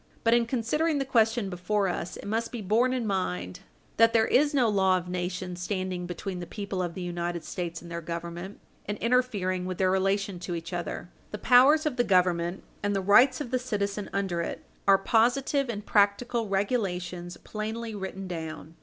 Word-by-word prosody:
But, 230 - +4
in 235 -1 +3
considering 285 +7 0
the 275 - -1
question 225 -3 +2
before 195 +2 0
us, 175 -1 -3
it - - -10
must 225 +3 -1
be 235 -4 -5
borne 230 +6 +3
in 255 -3 -1
mind 90 - -2 0.4
that 230 0 +6
there 225 -1 +4
is 290 +5 +3
no 265 -5 +3
law 190 -3 +3
of 180 -1 -5
nations 180 0 -4
standing 185 -1 -3
between 180 +1 -5
the 175 - -6
people 200 -3 -4
of 175 -2 -3
the 185 - -5
United 175 -1 -3
States 170 -1 -5
and 170 - -10
their 170 0 -4
Government 170 +3 -6 0.3
and 205 +1 -2
interfering 205 -7 0
with 185 -1 -4
their 185 -1 +2
relation 195 0 0
to 175 0 -4
each 170 +2 -6
other. 175 0 -4 0.2
The 210 - -5
powers 265 +8 +6
of 290 -4 -1
the 245 - +4
Government 180 -2 +2 0.2
and 205 0 0
the - - +1
rights 245 +8 +5
of 250 - -5
the 255 - +1
citizen 205 -4 -2
under 190 -4 -1
it - - -5 0.2
are 195 -1 +7
positive 245 +6 +2
and 210 -2 -4
practical 215 +2 +2
regulations 180 -4 -2
plainly 220 +1 -5
written 190 -1 -5
down. 160 -2 -6
195 Hz, 190 wpm, -28 LUFS, 180-230 Hz, 0.4 s, are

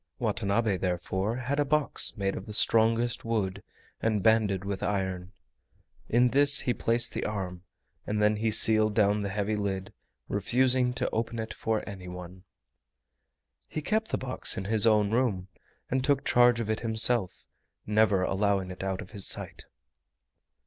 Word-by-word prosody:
Watanabe 100 0 0
therefore 95 +4 -2
had 130 +3 -3
a - - +4
box 145 -3 +1
made 95 -1 -1
of 95 - -8
the 105 - -6
strongest 115 +2 +2
wood 100 -4 -2 0.4
and 110 -3 0
banded 105 -4 +2
with 100 -1 -4
iron. 95 -2 -3 0.8
In 125 +2 +3
this 140 +3 +5
he 125 - 0
placed 115 +1 0
the - - -3
arm, 95 -4 -4 0.5
and 105 0 -1
then 105 0 +2
he 110 +1 0
sealed 110 0 +4
down 105 -1 +2
the 100 - -3
heavy 105 +2 -2
lid, 100 -2 -4 0.3
refusing 125 +5 +1
to 125 +1 -2
open 115 +1 -3
it 110 -1 -5
for 110 -1 -3
anyone. 90 -2 -9 1.2
He 155 - -5
kept 220 +6 0
the - - -2
box 130 -1 -3
in 95 - -4
his 110 +2 +2
own 105 -2 +3
room 110 -6 -1 0.4
and 130 0 0
took 140 0 +1
charge 120 -1 +4
of 115 - -3
it 110 0 -1
himself, 110 -3 +1 0.4
never 105 -3 +2
allowing 95 -1 0
it 90 - -8
out 95 -1 -3
of - - -16
his 100 -4 -3
sight. - - -3
105 Hz, 160 wpm, -28 LUFS, 95-115 Hz, 1.2 s, this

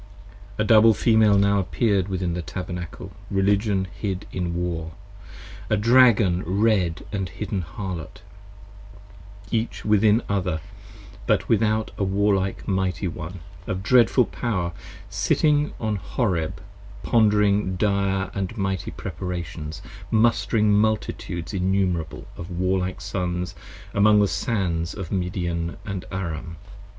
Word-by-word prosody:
A 110 - +1
Double 110 0 +6
Female 110 -3 +4
now 100 0 +3
appear'd 100 0 +1
within 95 -3 -2
the 90 - -2
Tabernacle, 90 +2 -6 0.2
Religion 100 0 +1
hid 95 -2 -4
in 90 -2 -2
War, 85 -2 -3 0.8
a 110 - +2
Dragon 110 -5 +5
red 95 -2 +1
& 95 -3 -3
hidden 100 -2 -2
Harlot, 90 -1 -7 1.3
Each 115 0 -2
within 105 +1 +4
other, 95 -5 -1 0.7
but - - +2
without 110 0 +1
a - - +1
Warlike 95 0 0
Mighty 95 -1 0
one, 85 +2 -6 0.3
55 - - -7
Of 95 +1 -2
dreadful 125 +2 +5
power, 95 -9 -2 0.4
sitting 150 -1 +2
upon 110 -2 -2
Horeb 95 -6 -1 0.4
pondering 105 -4 +3
dire 100 -1 0
And 100 +3 -3
mighty 95 -2 -2
preparations, 85 -4 -6 0.3
mustering 110 -1 +3
multitudes 105 -4 -1
innumerable 90 -4 -1
Of 85 +2 -8
warlike 90 +1 -1
sons 90 -2 -3 0.4
among 105 +1 +5
the 100 - +4
sands 90 -7 -1
of 95 -5 -6
Midian 85 -3 -2
& 95 -2 -5
Aram. 85 -3 -4
95 Hz, 115 wpm, -24 LUFS, 90-105 Hz, 1.3 s, Double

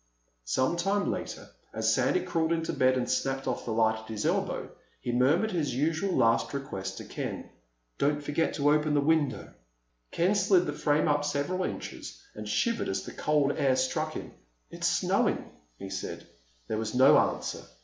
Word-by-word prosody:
Some 130 - +1
time 195 +3 +1
later, - - -5 0.3
as - - +2
Sandy 365 - +2
crawled 160 0 -1
into 165 -1 -1
bed 130 0 +3
and 125 - -1
snapped 135 0 -1
of 130 - -2
the 115 - -3
light 110 0 +2
at 110 - -13
his 110 -2 -3
elbow, - - -1 0.3
he 120 - -3
murmured 145 - +3
his 150 -8 -1
usual 160 +7 0
last 115 +4 +2
request 95 -9 -5
to - - -7
Ken. - - -5 0.5
"Don't 145 +1 +2
forget 145 +3 0
to 145 0 +3
open 150 0 +2
the - - +4
window." 150 -1 +1 0.6
Ken 180 +4 +2
slid 190 -3 +3
the 150 - -2
frame 150 +1 +1
up 145 -1 +2
several 145 +6 -1
inches - - -6
and 105 0 -7
shivered 230 - 0
as 95 0 -2
the - - -8
cold 150 -2 +2
air 135 -3 +3
struck 155 +5 -1
him. - - -7 0.4
"It's - - -1
snowing," - - +1 0.3
he 95 +6 -8
said. 95 - -5 0.4
There 110 - -2
was 110 +1 -3
no 135 +4 +7
answer. - - -1
145 Hz, 180 wpm, -29 LUFS, 125-160 Hz, 0.6 s, no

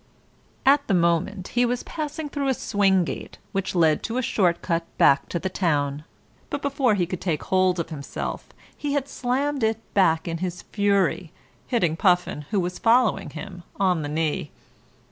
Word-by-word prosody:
At 280 +1 +4
the 195 - +2
moment 175 +3 +1
he 245 - +2
was 245 0 0
passing 310 -1 -4
through 285 -1 -2
a 265 - +2
swing 195 -4 +2
gate - - -6
which 195 -1 -2
led 160 -3 +3
to 230 - -3
a 255 - 0
short 180 -7 +1
cut 170 -1 0
back 140 - +4
to - - -1
the 190 - -2
town, 150 -6 -1 0.4
but 285 - -4
before 275 -5 +2
he 180 -3 +1
could 180 +1 -5
take 165 -6 -1
hold 185 -1 +2
of 165 - -3
himself 140 -3 -5 0.3
he 290 -1 -3
had 280 -1 0
slammed 270 +3 -1
it 220 0 +2 0.2
back 165 -5 +3
in 165 -1 -3
his 180 0 -4
fury, 200 -5 +1 0.4
hitting 175 -10 +1
Puffin, 180 -5 +1
who 205 - +1
was 180 0 -3
following 235 0 +3
him, 185 -3 -8 0.2
on 185 -4 +2
the 145 - -4
knee. 155 0 -1
190 Hz, 180 wpm, -24 LUFS, 170-245 Hz, 0.4 s, At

